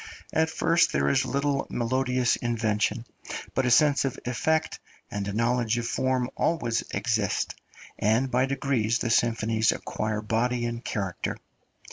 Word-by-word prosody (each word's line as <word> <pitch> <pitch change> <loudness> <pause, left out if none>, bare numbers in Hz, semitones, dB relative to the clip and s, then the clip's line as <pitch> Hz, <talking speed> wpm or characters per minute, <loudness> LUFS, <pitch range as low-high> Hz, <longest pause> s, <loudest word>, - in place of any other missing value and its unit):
At 160 0 +2
first 165 +1 +2
there 70 0 +2
is 70 - +2
little 140 0 0
melodious 125 +1 +1
invention, 115 -1 -1 0.5
but 130 -1 +1
a - - +3
sense 145 +4 +4
of 135 -2 -2
effect 155 +6 0 0.3
and 100 -1 -3
a - - -2
knowledge 115 +1 +1
of 120 - -2
form 130 -1 0
always 120 -8 0
exist, 110 -4 0 0.5
and 115 +5 +2
by 125 +2 +2
degrees 130 -5 0
the 120 - -1
symphonies 115 -1 +2
acquire 110 0 -3
body 120 +3 0
and 120 +1 -4
character. 95 -6 -3
120 Hz, 140 wpm, -27 LUFS, 110-130 Hz, 0.5 s, sense